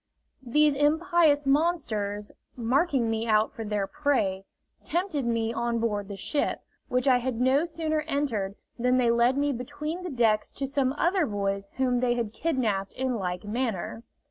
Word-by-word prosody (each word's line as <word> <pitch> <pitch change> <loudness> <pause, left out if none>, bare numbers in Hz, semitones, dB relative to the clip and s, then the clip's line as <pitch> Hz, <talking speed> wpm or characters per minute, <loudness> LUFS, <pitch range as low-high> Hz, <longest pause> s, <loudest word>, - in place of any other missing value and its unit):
These 295 +4 +3
impious 300 0 +3
monsters, 240 -10 0 0.2
marking 255 +1 +1
me 225 +1 -1
out 215 0 +3
for 225 - -6
their 210 -2 -1
prey, 210 -8 0 0.4
tempted 330 -6 -1
me 230 -1 0
on 235 0 -1
board 210 -3 -1
the 200 - -6
ship, 285 +9 -1 0.3
which 250 +2 0
I 255 -2 +5
had 245 -2 -3
no 265 +5 +3
sooner 315 -2 -1
entered 230 -10 -1 0.2
than 250 +1 +3
they 240 -2 +3
led 235 +3 +3
me 285 0 +2
between 290 +7 -5
the 365 - -5
decks 225 -6 +1
to 275 - -3
some 270 -1 0
other 345 +2 +1
boys 200 -1 -2
whom 250 -2 +2
they 245 -1 +1
had 230 -3 -2
kidnapped 220 -11 -1
in 260 0 -1
like 180 -2 -3
manner. 225 -1 -3
250 Hz, 165 wpm, -27 LUFS, 220-290 Hz, 0.4 s, I